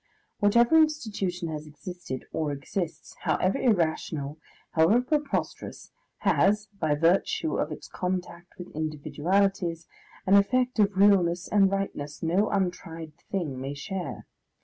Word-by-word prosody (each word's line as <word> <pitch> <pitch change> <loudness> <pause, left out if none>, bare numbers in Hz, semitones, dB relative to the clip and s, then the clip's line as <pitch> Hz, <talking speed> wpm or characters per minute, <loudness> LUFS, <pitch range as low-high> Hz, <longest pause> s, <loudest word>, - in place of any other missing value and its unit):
Whatever 235 +8 +5
institution 215 - +1
has 155 -1 -5
existed 165 -3 -7
or 155 -2 -1
exists, 155 +5 -5
however 185 +1 +1
irrational, 160 - 0 0.3
however 165 +9 +4
preposterous, 290 +3 -2 0.3
has, 200 +3 +2
by 155 -2 +2
virtue 175 - +2
of - - -1
its - - -7
contact 180 -1 -4
with 180 - -9
individualities, 165 +4 0 0.4
an 190 - +3
effect 250 +5 +3
of 200 -2 +3
realness 180 -3 +4
and 200 -2 +4
rightness 160 -8 -3
no 180 +6 +2
untried 165 -5 -3 0.2
thing 150 -10 -3
may 135 +2 -4
share. 180 +5 -5
180 Hz, 120 wpm, -27 LUFS, 160-200 Hz, 0.4 s, Whatever